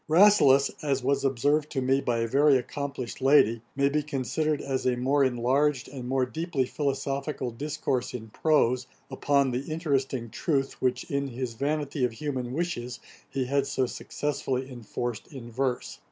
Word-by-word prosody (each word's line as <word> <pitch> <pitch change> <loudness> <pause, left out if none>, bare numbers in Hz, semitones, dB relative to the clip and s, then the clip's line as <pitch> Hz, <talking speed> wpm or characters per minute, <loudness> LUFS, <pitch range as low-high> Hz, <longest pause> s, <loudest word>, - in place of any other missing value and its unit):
Rasselas, 155 -7 +6
as 135 -3 0
was 140 +1 +1
observed 145 +3 +1
to 135 - 0
me 135 +1 +2
by 120 -3 0
a 115 - 0
very 140 +3 +5
accomplished 135 -1 -5
lady, 130 -5 +5
may 140 0 +3
be 150 +2 +1
considered 150 +1 -1
as 135 -1 -2
a 125 - +2
more 135 +3 +2
enlarged 130 +2 +1
and 130 -2 -7
more 130 -1 +2
deeply 160 0 -1
philosophical 140 -1 -2
discourse 130 -1 -2
in 110 -2 -7
prose, 130 -2 +2 0.2
upon 140 0 +2
the 130 +5 -3
interesting 135 -7 -1
truth, 135 -4 -1
which 130 -1 +1
in 140 0 0
his 125 -1 -4
Vanity 145 +2 -1
of 125 -2 +1
Human 130 -1 -3
Wishes 125 -6 -3 0.3
he 135 -2 -1
had 140 +1 +1
so 135 -2 +1
successfully 135 0 -3
enforced 120 -1 -5
in 120 -4 -10
verse. 130 +1 -2
135 Hz, 160 wpm, -27 LUFS, 125-145 Hz, 0.3 s, Rasselas